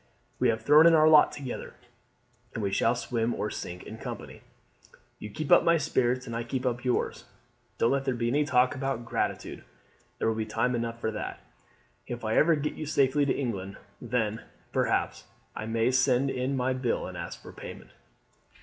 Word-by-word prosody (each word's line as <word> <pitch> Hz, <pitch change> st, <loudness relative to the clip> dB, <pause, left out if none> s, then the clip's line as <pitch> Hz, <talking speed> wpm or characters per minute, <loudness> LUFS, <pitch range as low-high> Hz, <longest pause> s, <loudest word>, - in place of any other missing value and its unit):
We -, -, +3 dB
have 110 Hz, -1 st, -1 dB
thrown 150 Hz, +6 st, +7 dB
in 165 Hz, -, +6 dB
our 155 Hz, 0 st, +6 dB
lot 155 Hz, -1 st, +7 dB
together, 135 Hz, -4 st, -7 dB, 0.8 s
and 110 Hz, -, -3 dB
we 100 Hz, -, 0 dB
shall 115 Hz, +4 st, +2 dB
swim 120 Hz, -1 st, -1 dB
or 105 Hz, -, -3 dB
sink 90 Hz, 0 st, -6 dB
in -, -, -9 dB
company. -, -, -8 dB, 0.8 s
"You 105 Hz, -, -7 dB
keep 145 Hz, +7 st, -5 dB
up -, -, +7 dB
my 170 Hz, 0 st, +4 dB
spirits 130 Hz, -4 st, 0 dB
and 115 Hz, -, -6 dB
I 115 Hz, -, -2 dB
keep 130 Hz, +2 st, -3 dB
up 120 Hz, -1 st, -1 dB
yours. 125 Hz, -1 st, -1 dB, 0.5 s
Don't 115 Hz, -, +2 dB
let 135 Hz, 0 st, 0 dB
there 130 Hz, -2 st, 0 dB
be 120 Hz, 0 st, -1 dB
any 145 Hz, +4 st, +2 dB
talk 130 Hz, -4 st, +3 dB
about 135 Hz, -3 st, -3 dB
gratitude. -, -, -3 dB, 0.5 s
There -, -, -1 dB
will 115 Hz, -, +2 dB
be 110 Hz, 0 st, -3 dB
time 115 Hz, +3 st, 0 dB
enough 115 Hz, -1 st, -3 dB
for 110 Hz, -, -1 dB
that 105 Hz, -, -5 dB, 0.7 s
if 120 Hz, -2 st, -5 dB
I 110 Hz, -, 0 dB
ever 165 Hz, +1 st, +5 dB
get 150 Hz, 0 st, -2 dB
you 155 Hz, -, -6 dB
safely 140 Hz, -1 st, +2 dB
to -, -, +2 dB
England. 100 Hz, -7 st, -4 dB, 0.2 s
Then, 110 Hz, -3 st, -1 dB, 0.3 s
perhaps, -, -, 0 dB, 0.3 s
I 110 Hz, -, -5 dB
may 115 Hz, +2 st, +1 dB
send 130 Hz, +1 st, +2 dB
in 130 Hz, +2 st, -1 dB
my 130 Hz, +1 st, +1 dB
bill 130 Hz, -2 st, -1 dB
and -, -, -7 dB
ask -, -, -6 dB
for -, -, -12 dB
payment." -, -, -10 dB
125 Hz, 195 wpm, -28 LUFS, 115-140 Hz, 0.8 s, thrown